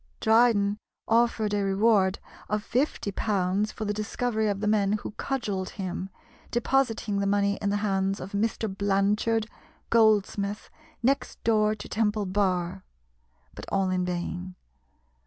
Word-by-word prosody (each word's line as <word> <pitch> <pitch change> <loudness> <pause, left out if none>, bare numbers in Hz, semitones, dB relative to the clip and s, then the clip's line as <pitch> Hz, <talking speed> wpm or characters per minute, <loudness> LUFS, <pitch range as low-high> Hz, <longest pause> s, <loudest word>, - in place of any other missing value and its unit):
Dryden 220 -3 +3 0.3
offered 225 -2 +2
a 205 - +1
reward 195 -1 +3 0.3
of 210 0 -1
fifty 250 -4 -1
pounds 200 0 0
for 220 - -5
the 205 - -1
discovery 220 +1 -1
of 200 -1 -1
the 210 - -2
men 210 -1 +2
who 215 - -3
cudgelled 210 -6 -3
him, 190 -1 -4 0.4
depositing 230 -4 0
the 200 - 0
money 200 0 +1
in 200 - 0
the 205 - +1
hands 195 -1 0
of 185 - -7
"Mr. 220 +2 -1
Blanchard, 205 +3 +1 0.5
goldsmith, 210 -2 +2 0.3
next 270 +3 0
door 215 -1 +3
to 205 - -9
Temple 210 -1 0
Bar," 185 -1 0 0.7
but - - -9
all 190 -1 +1
in 185 0 0
vain. 180 +1 -4
205 Hz, 140 wpm, -27 LUFS, 195-220 Hz, 0.7 s, Dryden